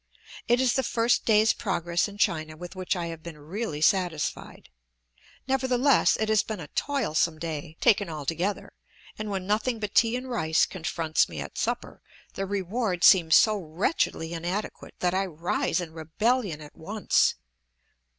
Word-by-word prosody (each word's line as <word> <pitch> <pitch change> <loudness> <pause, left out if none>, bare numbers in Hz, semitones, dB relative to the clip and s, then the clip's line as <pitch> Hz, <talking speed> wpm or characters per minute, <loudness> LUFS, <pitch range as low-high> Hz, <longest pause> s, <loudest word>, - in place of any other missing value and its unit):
It 240 +1 +3
is 255 -2 +3
the 265 - +2
first 235 -1 +1
day's 220 0 +4
progress 175 -3 -1
in 205 0 -11
China 155 -5 0
with 175 +3 -9
which 185 +1 -1
I 175 -1 -3
have 165 - -12
been 165 -1 -9
really 155 +1 -5
satisfied. 170 -5 0 0.8
Nevertheless, 260 0 +3
it 220 - -1
has 215 -1 +4
been 215 -3 -6
a 150 - -8
toilsome 175 - 0
day, 155 -1 -6
taken 205 -3 +3
altogether, 165 +6 -3 0.5
and 215 0 -4
when 190 -2 -3
nothing 220 +4 0
but 210 -2 -4
tea 230 0 +4
and 250 +1 -4
rice 160 -11 +2
confronts 165 -3 -1
me - - -7
at - - -7
supper - - -3 0.3
the 195 - -3
reward 195 -1 -2
seems 170 -5 +7
so 215 -1 +5
wretchedly 165 - -1
inadequate 175 +5 -4
that 180 0 +1
I 190 +1 0
rise 170 +2 -1
in 170 -3 -6
rebellion 170 +3 -1
at 150 - -12
once. 205 +6 +1
185 Hz, 160 wpm, -27 LUFS, 160-220 Hz, 0.8 s, seems